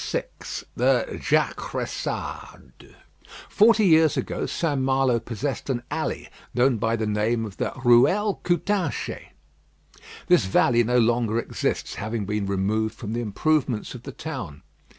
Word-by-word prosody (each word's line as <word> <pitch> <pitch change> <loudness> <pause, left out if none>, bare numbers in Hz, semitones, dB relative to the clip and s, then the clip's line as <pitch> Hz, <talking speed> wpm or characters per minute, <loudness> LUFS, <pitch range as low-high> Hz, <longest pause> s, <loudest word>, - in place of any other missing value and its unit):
VI - - +1 0.5
THE - - +1
JACRESSADE - - -3 0.5
Forty 220 0 +4
years 160 -3 +5
ago, - - -2
St. 145 -5 -1
Malo 130 -2 +2
possessed 120 +5 -4
an 120 -2 -1
alley - - -3 0.3
known 125 0 +3
by 115 +2 0
the 110 -1 -2
name 110 +2 0
of 100 -3 -9
the - - -1
"Ruelle 185 - +4
Coutanchez." 180 -1 -1 1.0
This 95 - +2
alley 120 0 +4
no 125 +2 +1
longer 115 -1 +2
exists, 115 - -2
having 110 0 -3
been 105 0 -2
removed 105 +3 0
for 120 - -10
the 115 +3 -2
improvements 125 +2 0
of 125 - -9
the 135 - -8
town. 125 - -7
120 Hz, 130 wpm, -24 LUFS, 110-145 Hz, 1.0 s, years